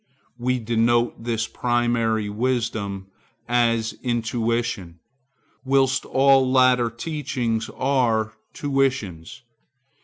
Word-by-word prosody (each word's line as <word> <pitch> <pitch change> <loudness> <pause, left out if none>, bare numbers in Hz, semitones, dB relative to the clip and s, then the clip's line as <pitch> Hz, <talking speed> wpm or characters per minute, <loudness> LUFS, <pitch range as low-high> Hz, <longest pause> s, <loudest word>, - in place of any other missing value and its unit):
We 125 +1 0
denote 120 0 +1
this 115 -1 -1
primary 120 -3 0
wisdom 105 -4 -2 0.4
as 115 -2 +1
Intuition, 115 -6 -2 0.7
whilst 135 0 +2
all 135 -1 +4
later 130 -2 +4
teachings 120 -3 -3
are 120 -5 0 0.2
tuitions. 135 - -2
120 Hz, 80 wpm, -23 LUFS, 110-130 Hz, 0.7 s, all